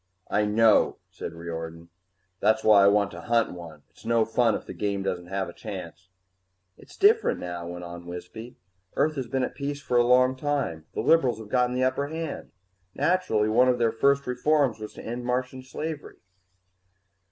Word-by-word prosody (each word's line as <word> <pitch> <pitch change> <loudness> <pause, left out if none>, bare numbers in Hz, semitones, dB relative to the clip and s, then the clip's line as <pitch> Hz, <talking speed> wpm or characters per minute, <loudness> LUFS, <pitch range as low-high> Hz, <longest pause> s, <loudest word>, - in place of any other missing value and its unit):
"I 105 0 +2
know," 110 +1 +4
said 85 - -7
Riordan. 85 0 -7 0.5
"That's 110 +1 +2
why 105 -2 +6
I - - +6
want 100 0 +3
to - - -9
hunt 115 -1 +1
one. 80 -4 -10
It's - - -20
no 115 -1 +2
fun 115 -1 +2
if - - -6
the - - -8
game 100 -1 -2
doesn't 90 -2 -3
have 95 0 -2
a 85 - -9
chance." 95 -3 -8 0.7
"It's - - -17
different 435 +3 +4
now," 85 -1 -5
went 90 0 -7
on 85 0 -9
Wisby. 90 +7 -8 0.4
"Earth 155 +1 +2
has 135 -4 -4
been 130 +1 -1
at - - -3
peace 140 0 -4
for 125 -3 -1
a 120 - +5
long 130 +1 +4
time. 130 - -2
The - - -1
liberals 130 -3 +3
have 110 -2 -10
gotten 125 +1 +1
the 130 - +1
upper 135 +2 0
hand. 160 0 -5 0.5
Naturally, 170 -13 +1
one 125 +4 +4
of 125 - +2
their 115 -2 +2
first 140 +4 +2
reforms 125 -1 +1
was 105 0 -8
to - - -10
end 120 +2 -4
Martian 125 +1 -2
slavery." 150 +4 -6
115 Hz, 185 wpm, -26 LUFS, 95-130 Hz, 0.7 s, why